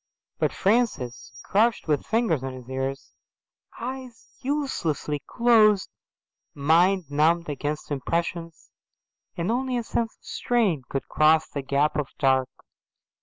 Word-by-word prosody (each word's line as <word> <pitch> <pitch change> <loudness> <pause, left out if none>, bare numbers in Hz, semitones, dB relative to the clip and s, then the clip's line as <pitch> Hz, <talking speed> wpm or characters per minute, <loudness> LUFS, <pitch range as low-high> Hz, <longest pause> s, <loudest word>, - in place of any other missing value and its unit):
But - - +1
Francis 195 - 0
crouched 220 +1 +2
with 150 -2 0
fingers 220 - +1
on 135 -1 -4
his 125 -2 -10
ears, 135 +1 -4 0.7
eyes 250 -1 -7
uselessly 250 - -2
closed, 220 -4 +4 0.6
mind 175 +6 +3
numbed 160 +3 +2
against 145 +1 -4
impressions, 165 +4 -3 0.7
and 175 +5 -1
only 255 +1 0
a 240 - -2
sense 225 0 -2
of - - -28
strain 215 - 0
could 135 - -3
cross 155 +1 +4
the 140 - -5
gap 140 +2 +1
of 150 -3 -1
dark. 130 -2 +2
165 Hz, 120 wpm, -25 LUFS, 145-225 Hz, 0.7 s, closed